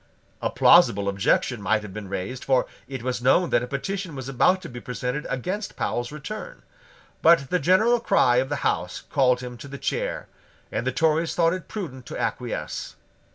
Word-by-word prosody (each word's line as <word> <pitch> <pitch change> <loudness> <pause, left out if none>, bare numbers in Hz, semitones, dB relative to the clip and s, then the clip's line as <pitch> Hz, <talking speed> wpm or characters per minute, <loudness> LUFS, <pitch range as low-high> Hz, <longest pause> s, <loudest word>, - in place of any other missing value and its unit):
A - - 0
plausible 100 0 +5
objection 100 +4 +1
might 105 +2 +1
have 100 -3 -9
been 105 -1 -7
raised; 100 +7 -4
for 130 -2 +2 0.2
it 135 -3 -6
was 125 -1 -2
known 165 +8 +3
that 120 - +3
a 125 - -4
petition 180 +5 -4
was 130 -2 -6
about 135 +8 +3
to - - -6
be 120 -1 -9
presented 125 +3 -4
against 185 - -3
Powle's 120 +1 -2
return: 150 +9 -7 0.6
but 160 -5 +5
the 180 - +2
general 215 - +4
cry 125 - +3
of 130 +1 +1
the 145 - -3
House - - -1
called 125 -2 +3
him 125 -1 -7
to 130 - -10
the 140 0 -7
chair; - - -2 0.4
and - - -2
the - - +2
Tories 160 0 +1
thought 165 0 +3
it 185 -2 -6
prudent 130 - -6
to - - -6
acquiesce. - - -3
135 Hz, 190 wpm, -25 LUFS, 125-170 Hz, 0.6 s, plausible